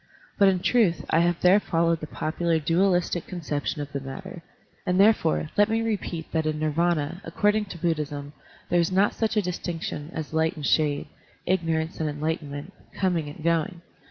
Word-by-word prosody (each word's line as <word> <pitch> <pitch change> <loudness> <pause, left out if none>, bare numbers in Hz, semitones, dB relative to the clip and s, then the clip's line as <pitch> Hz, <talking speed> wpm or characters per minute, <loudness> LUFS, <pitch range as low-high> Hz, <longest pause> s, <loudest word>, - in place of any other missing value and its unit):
But 200 - +7
in 185 -2 +2
truth 210 -6 +2
I 165 - +4
have 175 0 +2
there 185 +3 +6
followed 165 -3 +1
the 155 - -6
popular 165 +2 -1
dualistic 175 +2 +1
conception 150 -3 -3
of 145 - -9
the 140 - -3
matter; 170 +7 -8 0.4
and 180 0 +1
therefore 195 -7 +3
let 205 +1 +4
me 225 +1 +1
repeat 190 -7 -3
that 160 -1 0
in 155 -1 -1
Nirvdna, 160 +2 0
according 210 +5 +1
to 190 - -8
Buddhism, 150 -4 -2 0.4
there 175 - +4
is 170 +1 +1
not 195 +2 +3
such 225 0 -1
dis 180 -5 0
tinction 165 -3 -5
as 160 -2 -6
light 160 0 +1
and 150 -3 -5
shade, 150 -1 +2 0.4
ignorance 165 -3 0
and 155 -1 0
enlight 155 +3 -2
enment, 145 +5 -8 0.3
coming 175 -6 +1
and 150 +2 -10
going. 170 +2 0
170 Hz, 180 wpm, -26 LUFS, 155-185 Hz, 0.4 s, But